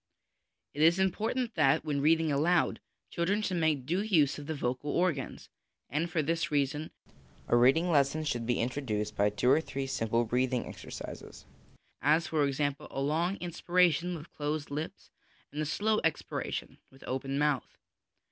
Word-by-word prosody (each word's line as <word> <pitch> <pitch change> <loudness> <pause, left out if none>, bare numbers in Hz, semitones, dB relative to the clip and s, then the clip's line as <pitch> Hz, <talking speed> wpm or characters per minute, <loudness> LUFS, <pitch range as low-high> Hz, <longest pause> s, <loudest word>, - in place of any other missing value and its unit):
It 145 - -3
is 165 +3 +6
important 220 +6 0
that, 155 -1 +3
when 145 -2 -1
reading 160 +1 +3
aloud, 165 +5 +2 0.3
children 195 +5 0
should 185 -3 -1
make 155 -5 +1
due 175 +7 0
use 160 -10 +2
of 145 - -9
the 160 - -2
vocal 130 +1 -2
organs, 160 -4 -1 0.4
and, 160 +4 0
for 165 -3 0
this 165 +1 0
reason, 145 +1 0 0.6
a - - +3
reading 135 +9 +4
lesson 145 +1 +2
should 120 -6 -2
be 120 - +1
introduced 115 -4 -2
by 100 +1 +3
two 105 +5 +2
or 155 - +5
three 135 -3 -4
simple 115 -3 0
breathing 125 +2 0
exercises, - - -9 0.6
as, 155 +3 +3
for 150 -3 +1
example, 145 +1 -2
a - - -5
long 165 +7 0
inspira 175 0 +2
tion 175 +3 -2
with 160 0 -10
closed 150 0 -3
lips 150 +3 -5 0.4
and 150 - -3
a 155 - -1
slow 215 +7 +1
expiration 160 -3 -3
with 135 - -17
open 135 +1 -3
mouth. 145 -2 0
150 Hz, 165 wpm, -30 LUFS, 135-170 Hz, 0.6 s, is